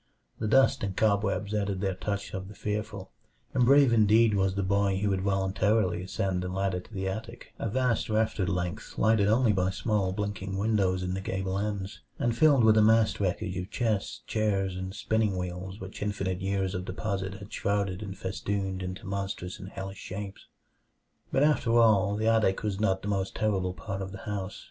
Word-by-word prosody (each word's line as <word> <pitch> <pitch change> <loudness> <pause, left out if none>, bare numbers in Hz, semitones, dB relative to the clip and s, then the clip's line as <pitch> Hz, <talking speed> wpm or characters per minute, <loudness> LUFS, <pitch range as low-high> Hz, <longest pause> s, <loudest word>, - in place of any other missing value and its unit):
The 110 - -1
dust 135 +3 +4
and 95 -2 -3
cobwebs 100 -1 +1
added 100 -2 -1
their 95 -1 0
touch 100 +2 -4
of 95 0 -4
the 105 - -11
fearful; 105 -2 -4 0.4
and 125 -2 +3
brave 140 -2 +6
indeed 110 0 +5
was 95 -1 +1
the 100 - 0
boy 100 0 +2
who 100 +1 0
would 95 -1 0
voluntarily 95 -1 +1
ascend 95 0 -2
the 90 - -3
ladder 95 0 -1
to 90 - -15
the 95 -2 -3
attic, 110 +5 -6
a 115 - -2
vast 125 0 0
raftered 110 -4 +1
length 90 -1 -3
lighted 110 -2 +3
only 110 +1 +4
by 95 -1 +1
small 100 -1 0
blinking 95 -1 -3
windows 100 -3 +1
in 90 0 -2
the 95 - -3
gable 95 0 -2
ends, 100 -1 -4 0.2
and 120 -1 0
filled 140 -2 +5
with 110 -1 +6
a - - +6
massed 110 +1 +4
wreckage 95 0 -1
of 90 +1 -4
chests, 110 -5 -1
chairs, 100 -4 0
and 95 +1 -5
spinning 110 -2 0
wheels 90 +2 -5
which 95 +1 -8
infinite 95 -3 -2
years 95 -1 -1
of 90 - -3
deposit 95 0 -3
had 100 0 -11
shrouded 100 -2 -1
and 95 -2 -6
festooned 95 0 -3
into 95 +4 -6
monstrous 95 -2 -4
and 95 0 -8
hellish 95 0 -7
shapes. 100 +1 -7 0.8
But 135 - +3
after 125 -6 +3
all, 105 -3 +4
the 110 +1 -1
attic 110 -4 +2
was 100 -2 -2
not 95 -3 +1
the - - -4
most 95 -2 -1
terrible 95 -4 0
part 100 -2 -5
of 95 0 -5
the 100 - -7
house. 100 -1 -4
100 Hz, 190 wpm, -28 LUFS, 95-110 Hz, 0.8 s, brave